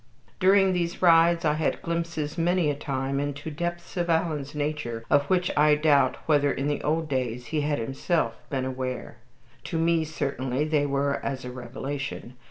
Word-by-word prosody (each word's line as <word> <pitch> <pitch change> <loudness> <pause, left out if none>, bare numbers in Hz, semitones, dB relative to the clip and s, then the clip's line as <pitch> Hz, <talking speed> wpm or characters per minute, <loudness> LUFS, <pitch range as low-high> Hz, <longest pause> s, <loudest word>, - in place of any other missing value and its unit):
During 190 0 +5
these 175 0 -2
rides 170 0 +5
I 150 - +3
had 155 0 -1
glimpses 165 -3 -2
many 170 -2 +2
a - - -3
time 135 -1 -2
into 145 +2 -4
depths 175 +4 -4
in 175 -1 -1
Alan's 155 -4 0
nature 145 -6 -3
of 145 0 +4
which 180 -1 +2
I 150 0 +5
doubt 145 -4 +3
whether 145 -2 +3
in 135 +1 -2
the 145 - -1
old 160 +1 0
days 125 -3 -2
he 155 - +2
had 145 0 0
himself 135 +8 -1
been 130 -3 -1
aware. 130 -1 -4 0.5
To 165 - -3
me 165 0 +2
certainly 140 -3 -2
they 150 -2 +1
were 140 0 0
as 135 -2 -3
a 125 - -5
revelation. 130 +1 -5
150 Hz, 175 wpm, -26 LUFS, 135-165 Hz, 0.5 s, During